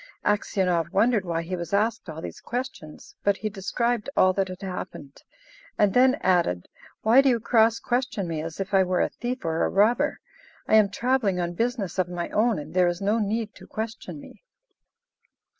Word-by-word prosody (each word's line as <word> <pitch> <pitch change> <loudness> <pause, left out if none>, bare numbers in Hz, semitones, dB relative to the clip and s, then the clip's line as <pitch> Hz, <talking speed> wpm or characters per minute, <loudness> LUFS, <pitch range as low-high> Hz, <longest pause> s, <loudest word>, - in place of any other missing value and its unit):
Aksionov 180 -5 +1
wondered 215 0 +2
why 165 -1 -2
he 185 +2 -4
was 170 0 -6
asked 220 -1 0
all 160 0 -7
these - - -7
questions, 245 -11 -6
but 200 -1 +2
he 215 - -3
described 235 +4 -1
all 185 0 +5
that 195 0 0
had 185 +1 -9
happened, 170 -6 -7 0.6
and 205 -2 +3
then 260 +1 +5
added, 175 - +1 0.4
"Why 230 +5 +6
do 275 - +3
you 240 -2 +2
cross 225 0 +3
question 245 -6 -2
me 160 -2 -3
as 160 +2 -7
if 195 +1 -4
I 195 - +6
were 180 -1 0
a - - +1
thief 250 -2 -5
or 160 0 0
a - - +1
robber? 235 +9 +2 0.5
I - - -1
am 215 -2 +6
travelling 225 -4 0
on 175 0 -2
business 220 -3 -2
of 180 -1 +1
my 175 -1 -4
own, 225 +1 +2
and 150 +2 -7
there 180 -1 +4
is 175 0 -1
no 205 +3 +1
need 220 +1 -2
to - - -14
question 215 -7 -6
me." - - -14
200 Hz, 190 wpm, -25 LUFS, 175-230 Hz, 0.6 s, Why